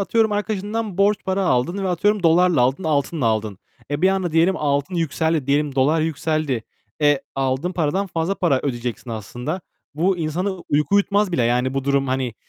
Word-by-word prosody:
atıyorum 220 +2 +2
arkadaşından 205 0 -3
borç 205 +1 +4
para 190 0 0
aldın 175 +7 0
ve - - 0
atıyorum 205 +3 +1
dolarla 175 -1 +4
aldın, 130 +9 +1
altınla 145 -3 0
aldın. 110 -3 -1 0.3
E, 145 +4 -2
bir 190 - +6
anda 190 -3 0
diyelim 170 +4 +3
altın 145 +4 -1
yükseldi, 160 -3 0
diyelim 145 0 +1
dolar 145 +4 +3
yükseldi. 155 -5 -1 0.4
E, 145 -2 +4
aldığın 135 +6 -1
paradan 180 +4 0
fazla 170 +2 -1
para 160 -9 +1
ödeyeceksin 120 -2 -4
aslında. 120 - -5 0.3
Bu 180 +5 +1
insanı 170 +5 -1 0.2
uyku 150 +6 +1
uyutmaz 200 -1 +2
bile. 125 - +1
Yani, 125 +3 +1
bu 135 -1 -2
durum 140 -1 +1
hani 130 -3 -1
160 Hz, 175 wpm, -21 LUFS, 135-190 Hz, 0.4 s, bir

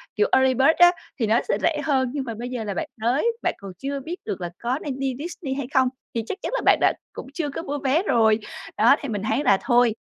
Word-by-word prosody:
kiểu, 425 - +3
Early 265 0 +4
Bird 265 +4 +5
á, 350 0 +8 0.3
thì 225 - +1
nó 225 +3 +4
sẽ - - +1
rẻ 315 -3 +1
hơn, 265 -4 +1
nhưng 285 -2 -2
mà 235 -3 -5
bây 240 +3 -6
giờ 250 -3 -4
là 205 -2 -3
bạn - - -3
tới, 245 - +1 0.2
bạn - - +1
còn 195 -1 -9
chưa 275 +1 -4
biết 320 +6 -5
được 200 -4 -4
là 175 - -3
có 250 +4 0
nên 270 -3 -5
đi 270 -2 -1
Disney 310 -3 -5
hay 270 -2 -4
không, 260 -1 +4 0.3
thì 230 - -1
chắc - - -4
chắn - - -3
là - - -1
bạn - - +6
đã - - +4 0.2
cũng - - -8
chưa 295 -1 -2
có 285 - -5
mua 290 -1 -3
vé 280 +6 +2
rồi. 220 - +3 0.4
Đó, - - +6
thì 280 - -5
mình 205 -3 -3
thấy 220 +7 0
là 200 - +4
thôi, 240 -3 +3
260 Hz, 275 wpm, -23 LUFS, 230-285 Hz, 0.4 s, á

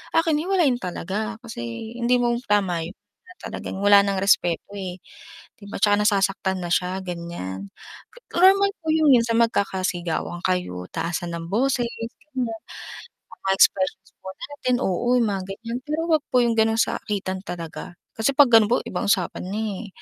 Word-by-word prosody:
akin 325 -2 +3
hiwalayan 335 -7 +2
talaga 200 +4 -4
kasi 120 - -6
hindi 245 +1 +2
mo 240 -1 +1
tama 190 -5 +1
'yun 175 - -8 0.3
na 365 - -14
talagang 190 - -6
wala 200 0 +6
ng 195 -1 -1
respeto, 175 -4 +2
eh. 185 -2 -6 0.6
'Di 205 - -12
ba - - -5
'tsaka 205 -1 +4
nasasaktan 195 -2 +1
na - - -3
siya 180 +2 0
ganiyan. 170 - -6 0.7
Normal 390 +3 +6
po - - -10
'yung 315 -1 +3
'yun 235 - +4
sa 230 - 0
magkakasigawan 185 -6 -1
kayo, 180 - -1
taasan 170 0 -3
ng 165 0 -6
boses 245 +2 +1 0.5
ganiyan, 255 -2 -1 1.0
mga - - 0
expressions 190 0 +2
po 190 - -8
natin, 270 -3 -2
oo 240 +7 +1
'yung 240 - +3
mga 195 -1 -2
ganiyan 230 +5 -5
pero 305 +2 -2
huwag 310 -2 +3
po 250 - +4
'yung 235 - +2
gano'ng 220 0 +3
sakitan 190 -3 -2
talaga, 175 0 -7 0.2
kasi 225 +5 +1
'pag 285 -4 +7
gano'n 220 -2 +7
po 245 - +5
ibang 210 - -3
usapan 195 -5 0
na, 210 +3 -2 0.2
eh. - - -9
205 Hz, 165 wpm, -23 LUFS, 180-245 Hz, 1.0 s, pag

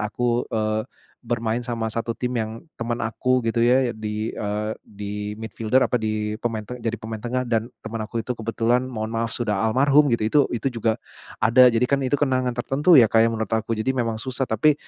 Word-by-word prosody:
aku, 120 +3 -1
eee, 110 0 -1 0.4
bermain 115 0 -1
sama 115 -2 -3
satu 115 0 -3
tim 125 0 -2
yang 110 +4 -4
temen 115 0 -3
aku 125 +2 0
gitu 115 +1 +1
ya 125 0 +3
di, 110 0 -4
eee, 105 +1 -2
di 105 0 -8 0.3
midfielder 110 +3 +1
apa, - - -4
di 110 -2 -1
pemain 110 -3 -2
te 125 - -6
jadi 115 -1 -2
pemain 110 -1 -7
tengah 125 +1 -2
dan 115 +1 0
teman 110 0 -5
aku 115 +2 -4
itu 125 - -1
kebetulan, 115 +2 0
mohon 110 -2 -3
maaf 115 0 -1
sudah 110 -3 -1
almarhum 140 +5 +4
gitu 110 -2 +1
itu 145 +6 +4
itu 120 +3 -3 0.2
juga 110 -1 +1 0.4
ada. 125 +3 +6
Jadi 115 +2 +2
kan 140 0 +1
itu 135 +2 +1
kenangan 130 -3 +1
tertentu 140 +6 +4
ya 115 - +8
Kak 115 +1 +4
ya, 115 - +3
menurut 110 -2 -3
aku 110 +1 -2
jadi 130 +4 0
memang 115 -3 -1
susah. 130 +2 -3
Tapi, 140 +7 +4
115 Hz, 200 wpm, -23 LUFS, 110-125 Hz, 0.4 s, ya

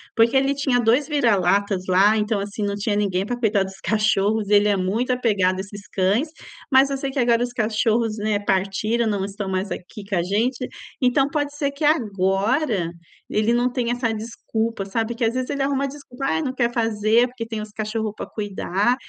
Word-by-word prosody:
porque 230 +3 +4
ele 270 +1 +2
tinha 270 -3 +1
2 240 +5 +3
vira-latas 200 - +2
lá, 195 +4 +5
então 210 -1 0
assim, 205 +1 -4
não 200 0 -1
tinha 205 +1 -1
ninguém 195 -2 0
para 245 +3 -3
cuidar 215 -4 +2
dos 190 0 -9
cachorros, 215 0 +1
ele 205 0 +5
é 200 - +2
muito 210 +7 0
apegado 205 -7 +1
a - - -5
esses 200 +1 -10
cães, 205 - +1 0.4
mas 265 +1 +6
eu - - 0
sei 270 0 -3
que 270 - -2
agora 235 -1 +3
os 245 - -3
cachorros, 225 -1 +1
né, 210 -1 0
partiram, 205 +4 0
não 200 -3 0
estão 200 0 -5
mais 190 +1 -2
aqui 200 +3 -7
com 200 - 0
a 170 - +1
gente, 230 +7 0 0.4
então 265 +2 +3
pode 290 -1 -2
ser 280 -1 0
que 280 +3 -7
agora 210 - +1 0.4
ele 215 +2 +1
não 245 +1 +2
tenha 240 -2 -1
essa 240 -2 -1
desculpa, 225 -1 -3
sabe, 225 +4 -2
que 235 +1 -4
às 225 - +1
vezes 255 0 -2
ele 280 -1 -2
arruma 275 0 0
desculpa, 270 -2 -8
"ai 320 - +1
não 265 -4 -2
quer 240 -2 +1
fazer 225 +1 +2
porque 245 -2 -7
tem 225 -1 -4
os 210 - -7
cachorro 215 0 -3
pra - - -6
cuidar", 205 +2 -1
220 Hz, 205 wpm, -22 LUFS, 205-250 Hz, 0.4 s, mas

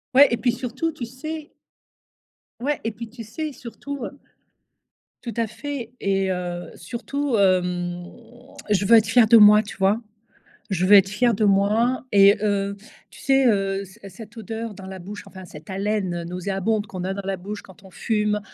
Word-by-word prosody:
Ouais 285 +1 +9
et 235 - +1
puis 245 0 +1
surtout 255 +6 -3
tu 280 -6 -6
sais 300 +6 -7 1.1
Ouais 290 +3 -1
et 225 - -2
puis 230 +2 -8
tu 235 0 -9
sais, 300 +7 -5
surtout, 255 +3 -8
heu 280 - -9 1.1
tout 235 - -5
à 230 -1 0
fait 245 +1 -6
et 195 -1 0
heu, 175 -1 -4
surtout, 250 - -3
hem, 180 -2 +1 0.6
je 205 -1 +2
veux 230 - +7
être 220 -2 +5
fière 225 -1 +5
de 230 - +6
moi 210 0 +8
tu 205 - -9
vois? 195 +3 +2 0.7
Je 185 -1 0
veux 205 - +7
être 195 -1 +6
fière 235 +2 +2
de 215 - 0
moi 210 +6 +2
et 200 0 +6
heu, 200 -1 0 0.4
tu - - -15
sais, 270 -1 +3
heu, 195 -2 +1
c 190 +4 -17
cette 215 +4 -12
odeur 225 0 -6
dans 190 -1 -11
la 190 0 -8
bouche, 205 +4 -8
enfin 190 -1 -11
cette 155 -1 -13
haleine, 195 -1 -1
heu, - - -8
nauséabonde 195 +4 -2
qu'on 185 -3 -6
a 190 - -1
dans 195 0 -6
la 195 - -1
bouche 200 +3 -7
quand 190 0 -17
on 190 - -14
fume. 210 +2 -1
210 Hz, 190 wpm, -23 LUFS, 190-235 Hz, 1.1 s, Ouais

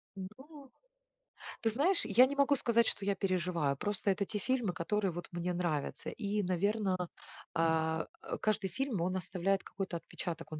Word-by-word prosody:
Ну. 265 +9 -10 0.9
Ты 225 - +2
знаешь, 315 - +3
я 230 +5 +7
не 280 +2 -3
могу 280 0 +4
сказать, 235 -3 +3
что 200 - 0
я 200 0 +2
переживаю. 180 -6 0
Просто 205 +3 -1
это 200 +1 0
те 210 - -2
фильмы, 240 -6 0
которые 190 +2 0
вот 175 +1 -6
мне 175 +1 -2
нравятся. 170 -5 -2
И 210 -1 -1
наверно, 185 0 0 0.4
а, 160 0 +1 0.3
каждый 215 -2 +1
фильм 255 -2 -2
он 185 +2 0
оставляет 190 +1 0
какой-то 190 -3 -4
отпечаток, 165 0 -6
он 155 - -5
195 Hz, 160 wpm, -33 LUFS, 175-220 Hz, 0.9 s, я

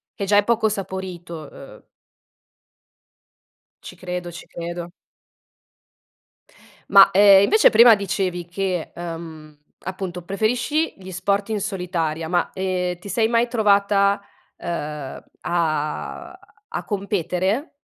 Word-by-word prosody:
che 200 - -3
già 205 +1 +3
è 205 - +5
poco 220 -1 +2
saporito, 180 -5 -6
uhm 135 - -13 2.0
Ci - - -10
credo, 180 -1 -5
ci 170 - -11
credo. 170 0 -6 2.0
Ma, 195 -1 +8
ehm, 195 0 +7
invece 435 - +5
prima 230 0 +8
dicevi 180 -3 -2
che, 185 -2 -3
ehm, 165 -3 -8 0.3
appunto 185 -1 -5
preferisci 245 - 0
gli 190 0 -10
sport 200 +4 -1
in 215 -2 -1
solitaria, 175 -5 -2
ma, 175 -1 +1
ehm, 180 -2 -2
ti 200 - -10
sei 220 +3 +2
mai 235 +1 +2
trovata, 200 -3 +2 0.4
uhm, 150 -5 -5 0.2
a 155 -3 -2 0.4
a - - -2
competere? 195 - -1
190 Hz, 110 wpm, -22 LUFS, 175-205 Hz, 2.0 s, Ma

